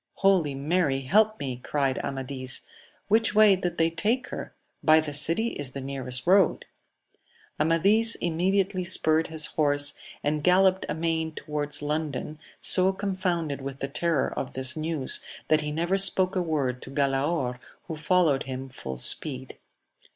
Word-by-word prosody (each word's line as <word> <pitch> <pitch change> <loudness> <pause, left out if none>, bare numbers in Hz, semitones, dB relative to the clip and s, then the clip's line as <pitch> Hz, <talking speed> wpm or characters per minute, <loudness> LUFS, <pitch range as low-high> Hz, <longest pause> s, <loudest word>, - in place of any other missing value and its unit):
Holy 180 -8 +2
Mary, 140 -1 0
help 215 +10 +2
me! 130 -3 -4
cried 135 +1 -2
Amadis: 130 -1 -3 0.5
which 220 +1 +2
way 215 -2 +6
did 180 -1 -4
they 165 0 +2
take 230 +10 -1
her? - - -7 0.2
— - - -46
By 155 0 +6
the 155 -2 -4
city 165 +10 +4
is 140 - -3
the 140 - -5
nearest 130 -2 -4
road. 190 -1 +3 0.9
Amadis 195 +9 +4
immediately 185 +3 0
spurred 160 -3 +2
his 160 -1 +2
horse, 145 -2 +1 0.3
and 150 0 -1
galloped 185 +1 +3
amain 160 0 -2
towards 150 -1 -4
London, 150 -1 -3 0.3
so 185 0 +3
confounded 185 -7 -3
with 135 0 -7
the 135 - -3
terror 160 +1 -1
of 130 - -5
this 130 0 -3
news 155 -3 -1 0.3
that 155 0 +3
he 150 0 -4
never 170 +5 0
spoke 190 0 +2
a 185 - +1
word 140 -7 -2
to - - -8
Galaor, 135 -1 -1 0.2
who 165 - -7
followed 155 -3 +2
him 130 +1 -6
full 65 - -7
speed. 130 - -1
155 Hz, 150 wpm, -26 LUFS, 140-185 Hz, 0.9 s, way